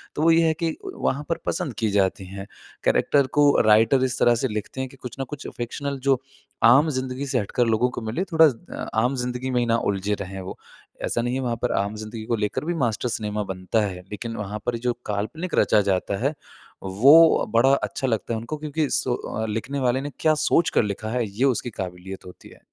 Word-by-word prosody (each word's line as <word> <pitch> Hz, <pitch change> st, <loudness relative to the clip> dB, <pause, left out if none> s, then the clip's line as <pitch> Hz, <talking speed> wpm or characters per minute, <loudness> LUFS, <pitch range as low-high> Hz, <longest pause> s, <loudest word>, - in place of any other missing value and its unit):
तो 150 Hz, -, -2 dB
वो 165 Hz, -, +6 dB
ये 165 Hz, 0 st, +4 dB
है 160 Hz, -, +3 dB
कि 160 Hz, -1 st, 0 dB, 0.2 s
वहाँ 140 Hz, +3 st, -1 dB
पर 165 Hz, -, 0 dB
पसंद 135 Hz, -, -2 dB
की 110 Hz, -2 st, +1 dB
जाती 95 Hz, -1 st, +1 dB
हैं। 95 Hz, +1 st, -7 dB, 0.4 s
कैरेक्टर 140 Hz, -2 st, +3 dB
को 145 Hz, 0 st, +6 dB, 0.2 s
राइटर 110 Hz, +5 st, +5 dB
इस 130 Hz, 0 st, -3 dB
तरह 120 Hz, 0 st, +5 dB
से -, -, +3 dB
लिखते 105 Hz, +4 st, -5 dB
हैं 130 Hz, -, -4 dB
कि 135 Hz, -, -16 dB
कुछ 125 Hz, -1 st, -8 dB
न -, -, 0 dB
कुछ 150 Hz, -2 st, -7 dB
फिक्शनल 140 Hz, +4 st, -4 dB
जो 130 Hz, -1 st, +3 dB, 0.4 s
आम 135 Hz, +7 st, +6 dB
ज़िन्दगी 130 Hz, -1 st, -3 dB
से 130 Hz, -2 st, +1 dB
हटकर 120 Hz, +4 st, 0 dB
लोगों 115 Hz, +2 st, +2 dB
को -, -, -2 dB
मिले 110 Hz, +11 st, -2 dB
थोड़ा 160 Hz, 0 st, +7 dB, 0.4 s
अ, -, -, -5 dB
आम 125 Hz, +2 st, +1 dB
ज़िन्दगी 125 Hz, +1 st, -3 dB
में 125 Hz, -, +1 dB
ही 120 Hz, -, +1 dB
ना 115 Hz, 0 st, +2 dB
उलझे 100 Hz, +1 st, -2 dB
रहे 95 Hz, 0 st, -6 dB
वो। 95 Hz, -, -7 dB, 0.5 s
ऐसा 120 Hz, -, 0 dB
नहीं 120 Hz, +1 st, -1 dB
है 135 Hz, -, -1 dB
वहाँ 120 Hz, -2 st, -1 dB
पर 125 Hz, -, +1 dB
आम 100 Hz, +2 st, -5 dB
ज़िन्दगी 110 Hz, +1 st, -7 dB
को 115 Hz, -, 0 dB
लेकर 105 Hz, +6 st, -2 dB
भी 175 Hz, -, -1 dB
मास्टर 115 Hz, +2 st, -2 dB
सिनेमा 105 Hz, -1 st, -2 dB
बनता 95 Hz, +3 st, -1 dB
है। 90 Hz, -2 st, -5 dB
लेकिन 115 Hz, +2 st, -5 dB
वहाँ 105 Hz, +1 st, -4 dB
पर 120 Hz, -1 st, 0 dB
जो 120 Hz, -, +2 dB
काल्पनिक 110 Hz, -, -3 dB
रचा 105 Hz, -, +4 dB
जाता 95 Hz, +2 st, -1 dB
है, 145 Hz, -, +2 dB, 0.5 s
वो 140 Hz, +13 st, +6 dB
बड़ा 130 Hz, +4 st, +5 dB
अच्छा 135 Hz, -1 st, -1 dB
लगता 115 Hz, -1 st, -1 dB
है 110 Hz, -, -1 dB
उनको 120 Hz, +7 st, -5 dB
क्योंकि 150 Hz, 0 st, -2 dB
सो 120 Hz, -3 st, -1 dB
लिखने 120 Hz, +6 st, -3 dB
वाले 130 Hz, 0 st, +1 dB
ने 145 Hz, +1 st, -5 dB
क्या 155 Hz, -1 st, +4 dB
सोचकर 165 Hz, -7 st, +3 dB
लिखा 105 Hz, +1 st, -4 dB
है 120 Hz, 0 st, 0 dB
ये 110 Hz, +7 st, 0 dB
उसकी 125 Hz, -2 st, 0 dB
क़ाबिलियत 95 Hz, 0 st, -7 dB
होती 90 Hz, -, -13 dB
है। -, -, -17 dB
120 Hz, 220 wpm, -24 LUFS, 105-135 Hz, 0.5 s, थोड़ा